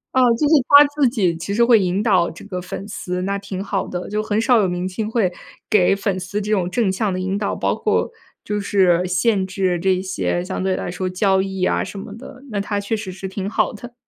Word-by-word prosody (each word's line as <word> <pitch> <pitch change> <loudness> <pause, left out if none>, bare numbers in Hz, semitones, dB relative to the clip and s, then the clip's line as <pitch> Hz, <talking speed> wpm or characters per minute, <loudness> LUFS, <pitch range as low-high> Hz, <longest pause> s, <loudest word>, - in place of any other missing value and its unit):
啊， 260 - +5
就 235 +6 +1
是 310 - +3 0.2
他 285 +1 +9
自 285 -4 +3
己 195 -9 0
其 170 +5 -4
实 235 +3 +3
会 235 -1 +6
引 190 -1 0
导 185 -7 +2
这 165 - -12
个 185 -3 -5
粉 185 +2 -7
丝， 180 -3 -4
那 200 +1 -1
挺 195 -1 -6
好 195 -1 -2
的。 180 0 -5
就 210 +1 -1
很 215 0 0
少 245 0 +4
有 195 - +2
明 180 +1 -2
星 215 +3 -4
会 225 -6 +2 0.4
给 195 -3 +4
粉 200 -1 -1
丝 185 +3 -4
这 210 +1 -4
种 180 -4 0
正 220 0 +1
向 200 +2 -1
的 185 - -3
引 190 +2 -2
导， 205 -1 -2
包 - - 0
括 - - 0 0.3
就 210 0 -3
是 185 -3 +2
限 190 +2 +1
制 185 -1 -1
这 185 +1 +1
些 185 -2 -2
相 185 - -4
对 190 0 +1
来 - - -4
说 185 +1 -3
交 190 +1 +2
易 190 -1 -2
啊 - - +1
什 200 - -7
么 200 - -8
的， 255 +3 -11
那 205 -3 -2
他 205 0 -2
确 200 +2 -2
实 210 -3 -5
是 190 +1 -7
挺 195 +1 -4
好 220 - 0
的。 240 +3 -10
195 Hz, 265 characters per minute, -20 LUFS, 185-215 Hz, 0.4 s, 他